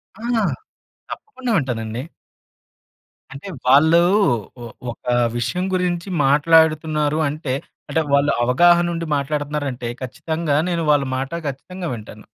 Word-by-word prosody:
ఆ! 210 Hz, -, -14 dB, 0.9 s
తప్పకుండా 260 Hz, -, -5 dB
వింటానండి. 120 Hz, -4 st, -3 dB, 1.3 s
అంటే. 140 Hz, +8 st, -9 dB, 0.2 s
వాళ్ళు 160 Hz, +6 st, +6 dB, 0.6 s
ఓహ్! 115 Hz, -, -9 dB, 0.2 s
ఒక -, -, -15 dB, 0.3 s
విషయం 125 Hz, +10 st, -1 dB
గురించి 180 Hz, -1 st, -1 dB, 0.2 s
మాట్లాడుతున్నారు 155 Hz, +1 st, +3 dB
అంటే. 145 Hz, -2 st, -4 dB, 0.4 s
అంటే 160 Hz, -, +1 dB
వాళ్ళు 140 Hz, +1 st, +4 dB
అవగాహన 175 Hz, +7 st, +4 dB
ఉండి 165 Hz, 0 st, -3 dB
మాట్లాడుతున్నారు 145 Hz, +1 st, -2 dB
అంటే 120 Hz, -1 st, -5 dB
ఖచ్చితంగా 160 Hz, +4 st, -2 dB
నేను 170 Hz, -2 st, -1 dB
వాళ్ళ 145 Hz, -1 st, +3 dB
మాట 135 Hz, +3 st, -4 dB, 0.2 s
ఖచ్చితంగా 175 Hz, +6 st, -6 dB
వింటాను. 110 Hz, -2 st, -10 dB
150 Hz, 110 wpm, -20 LUFS, 135-170 Hz, 1.3 s, వాళ్ళు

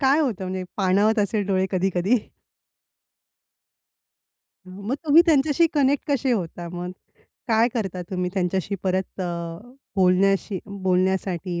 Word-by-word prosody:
काय 275 Hz, +1 st, +4 dB
होतं? 225 Hz, -, -1 dB
म्हणजे 185 Hz, 0 st, -4 dB
पाणावत 205 Hz, +3 st, +2 dB
असेल 205 Hz, 0 st, 0 dB
डोळे 190 Hz, -1 st, +1 dB
कधी-कधी? 190 Hz, +3 st, +1 dB, 2.5 s
मग 200 Hz, +6 st, -4 dB
तुम्ही 310 Hz, +2 st, +7 dB
त्यांच्याशी 305 Hz, +1 st, +4 dB
कनेक्ट 285 Hz, 0 st, +1 dB
कसे 265 Hz, -2 st, +1 dB
होता 175 Hz, -5 st, -3 dB
मग? 180 Hz, 0 st, -5 dB, 0.6 s
काय 225 Hz, +1 st, +4 dB
करता 195 Hz, -6 st, -3 dB
तुम्ही 180 Hz, -1 st, -2 dB
त्यांच्याशी 190 Hz, +1 st, -1 dB
परत 190 Hz, +1 st, -2 dB
अ, -, -, -1 dB, 0.7 s
बोलण्याशी 190 Hz, +1 st, +2 dB
बोलण्यासाठी 185 Hz, -2 st, -1 dB
195 Hz, 115 wpm, -23 LUFS, 185-230 Hz, 2.5 s, तुम्ही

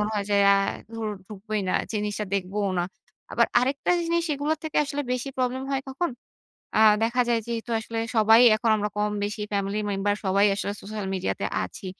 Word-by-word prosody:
মনে 210 Hz, +1 st, 0 dB
হয় 200 Hz, -1 st, -1 dB
যে, -, -, +3 dB, 0.2 s
আ -, -, +6 dB, 0.4 s
ধুর 225 Hz, -1 st, -3 dB, 0.2 s
ঢুকবই 210 Hz, +1 st, -4 dB
না, -, -, 0 dB, 0.2 s
জিনিসটা 210 Hz, 0 st, -2 dB
দেখবোও 200 Hz, +1 st, -1 dB
না। 175 Hz, -, +1 dB, 0.5 s
আবার -, -, +4 dB
আরেকটা 275 Hz, +6 st, 0 dB
জিনিস 335 Hz, 0 st, 0 dB
এগুলার 295 Hz, +2 st, -1 dB
থেকে 315 Hz, -, -4 dB
আসলে 290 Hz, 0 st, -3 dB
বেশি 250 Hz, +2 st, -2 dB
প্রবলেম 255 Hz, +1 st, -1 dB
হয় 270 Hz, -, 0 dB
কখন? 335 Hz, +5 st, -1 dB, 0.7 s
আ -, -, +4 dB, 0.2 s
দেখা 235 Hz, +2 st, +1 dB
যায় 235 Hz, -, +3 dB
যেহেতু 235 Hz, 0 st, -4 dB
আসলে 225 Hz, +1 st, -5 dB, 0.2 s
সবাই 220 Hz, +2 st, +6 dB, 0.2 s
এখন 225 Hz, +1 st, 0 dB
আমরা 210 Hz, 0 st, -1 dB
কম 210 Hz, 0 st, +1 dB
বেশি 210 Hz, +1 st, -4 dB
ফ্যামিলি 200 Hz, +1 st, -1 dB
মেম্বার 200 Hz, +1 st, 0 dB
সবাই 200 Hz, +2 st, +3 dB
আসলে 200 Hz, 0 st, -3 dB
সোশ্যাল 210 Hz, 0 st, -5 dB
মিডিয়া 190 Hz, -1 st, -1 dB
তে -, -, -1 dB, 0.2 s
আছি। 190 Hz, -, -9 dB
215 Hz, 190 wpm, -25 LUFS, 205-250 Hz, 0.7 s, আ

